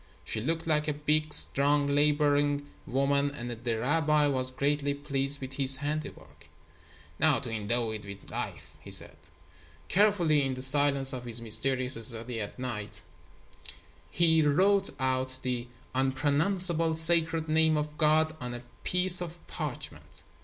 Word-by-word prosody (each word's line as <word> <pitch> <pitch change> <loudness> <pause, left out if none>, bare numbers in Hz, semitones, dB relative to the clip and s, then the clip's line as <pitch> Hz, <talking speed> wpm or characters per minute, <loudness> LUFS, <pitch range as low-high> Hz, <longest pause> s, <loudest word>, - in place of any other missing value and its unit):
She 110 - -2
looked 165 +6 -2
like 150 -1 0
a 150 - 0
big, 150 +1 -1
strong, 145 0 +6
laboring 145 0 +1 0.2
woman, 140 +2 0
and 120 -4 -7
the 115 0 -4
rabbi 150 +4 +1
was 130 -3 +1
greatly 140 +2 -1
pleased 140 0 -1
with 130 0 -8
his 135 0 +5
handiwork. 145 +2 -7 0.7
"Now 155 -5 +3
to 120 -1 -7
endow 115 +1 -2
it 110 -1 -7
with 100 -1 -11
life," - - -6
he - - -13
said. - - -2 0.7
Carefully, 180 -7 +2
in 135 -1 -2
the 130 - 0
silence 140 0 +3
of 125 -1 -6
his 120 -1 -1
mysterious 125 +2 +2
study 115 -1 -2
at 100 - -7
midnight, 105 -5 -6 1.1
he 160 -2 +2
wrote 190 +7 +2
out 130 0 -2
the 125 -1 -3 0.3
Unpronounceable 160 +6 +1
Sacred 165 0 +1
Name 160 0 +2
of 150 0 -4
God 155 0 +2
on 125 0 -5
a 120 - -9 0.2
piece 180 0 +2
of 170 0 -8
parchment. - - -2
145 Hz, 145 wpm, -28 LUFS, 130-155 Hz, 1.1 s, strong